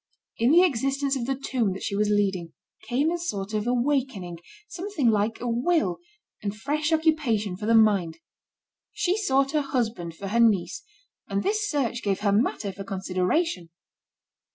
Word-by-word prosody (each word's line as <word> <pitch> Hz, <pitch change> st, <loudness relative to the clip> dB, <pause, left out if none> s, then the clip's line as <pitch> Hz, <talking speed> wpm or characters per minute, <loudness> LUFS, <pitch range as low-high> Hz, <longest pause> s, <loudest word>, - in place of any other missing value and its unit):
In 230 Hz, +2 st, +3 dB
the 340 Hz, +5 st, +7 dB
existence 275 Hz, -2 st, 0 dB
of 245 Hz, -3 st, -3 dB
the 270 Hz, -, 0 dB
tomb 250 Hz, -6 st, -1 dB
that 190 Hz, -, -7 dB
she 200 Hz, -, -2 dB
was 210 Hz, +1 st, +1 dB
leading, 195 Hz, -5 st, 0 dB, 0.3 s
came 280 Hz, +6 st, +1 dB
a 345 Hz, -, -2 dB
sort 205 Hz, -, -4 dB
of 215 Hz, +1 st, -1 dB
awakening, 245 Hz, -, -1 dB, 0.3 s
something 350 Hz, -, -1 dB
like 215 Hz, +2 st, 0 dB
a 245 Hz, -, -4 dB
will, 240 Hz, -, +1 dB, 0.4 s
and 205 Hz, 0 st, -4 dB
fresh 300 Hz, +6 st, -1 dB
occupation 300 Hz, -, +1 dB
for 210 Hz, +3 st, -5 dB
the 230 Hz, -, +4 dB
mind. 200 Hz, -7 st, +3 dB, 0.8 s
She 365 Hz, +1 st, +1 dB
sought 275 Hz, -9 st, +1 dB
a 305 Hz, -, +2 dB
husband 225 Hz, -, -2 dB
for 195 Hz, +3 st, -6 dB
her 230 Hz, +3 st, +1 dB
niece, 225 Hz, -, +2 dB, 0.5 s
and 200 Hz, 0 st, -1 dB
this 420 Hz, 0 st, 0 dB
search 255 Hz, -5 st, -1 dB
gave 200 Hz, -3 st, -1 dB
her 205 Hz, -1 st, +2 dB
matter 205 Hz, -1 st, 0 dB
for 195 Hz, +1 st, -8 dB
consideration. 185 Hz, -, -1 dB
230 Hz, 165 wpm, -26 LUFS, 200-285 Hz, 0.8 s, the